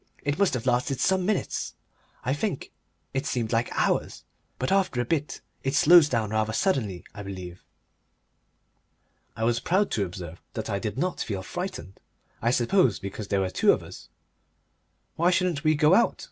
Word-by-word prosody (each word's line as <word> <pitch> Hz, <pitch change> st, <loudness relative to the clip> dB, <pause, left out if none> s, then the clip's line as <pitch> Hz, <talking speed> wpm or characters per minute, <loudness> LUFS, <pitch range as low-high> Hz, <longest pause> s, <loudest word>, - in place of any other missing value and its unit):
It 145 Hz, +1 st, -1 dB
must 200 Hz, -8 st, +3 dB
have 125 Hz, -, -4 dB
lasted 125 Hz, +1 st, +1 dB
some 190 Hz, -1 st, +2 dB
minutes, 210 Hz, -2 st, -1 dB, 0.5 s
I 130 Hz, -, +1 dB
think 155 Hz, 0 st, -3 dB, 0.4 s
it 135 Hz, +2 st, -1 dB
seemed 120 Hz, -4 st, -1 dB
like 115 Hz, +1 st, +1 dB
hours. -, -, 0 dB, 0.3 s
But 130 Hz, -, -2 dB
after 195 Hz, -10 st, +2 dB
a 120 Hz, -, +1 dB
bit 150 Hz, +1 st, -2 dB, 0.2 s
it 135 Hz, +1 st, -1 dB
slows 165 Hz, -2 st, +7 dB
down 110 Hz, -5 st, -1 dB
rather 110 Hz, 0 st, 0 dB
suddenly, 115 Hz, -, 0 dB
I 100 Hz, -, -8 dB
believe." 95 Hz, -3 st, -8 dB, 1.7 s
I 110 Hz, -, -3 dB
was 115 Hz, +1 st, +2 dB
proud 190 Hz, +10 st, +1 dB
to 105 Hz, -, +1 dB
observe 85 Hz, -2 st, -8 dB
that -, -, -3 dB
I 100 Hz, -, -1 dB
did 105 Hz, +1 st, -4 dB
not 180 Hz, +6 st, -1 dB
feel 100 Hz, -4 st, -3 dB
frightened 175 Hz, -, -6 dB, 0.4 s
I 115 Hz, -, +2 dB
suppose 125 Hz, -, +3 dB
because 100 Hz, +2 st, -6 dB
there 100 Hz, -2 st, +1 dB
were 95 Hz, -1 st, -1 dB
two -, -, +4 dB
of -, -, -3 dB
us. -, -, -12 dB, 1.1 s
"Why 170 Hz, +2 st, +4 dB
shouldn't 180 Hz, -4 st, +1 dB
we 155 Hz, 0 st, +4 dB
go 150 Hz, +3 st, +4 dB
out?" 235 Hz, +5 st, +3 dB
125 Hz, 175 wpm, -26 LUFS, 105-170 Hz, 1.7 s, slows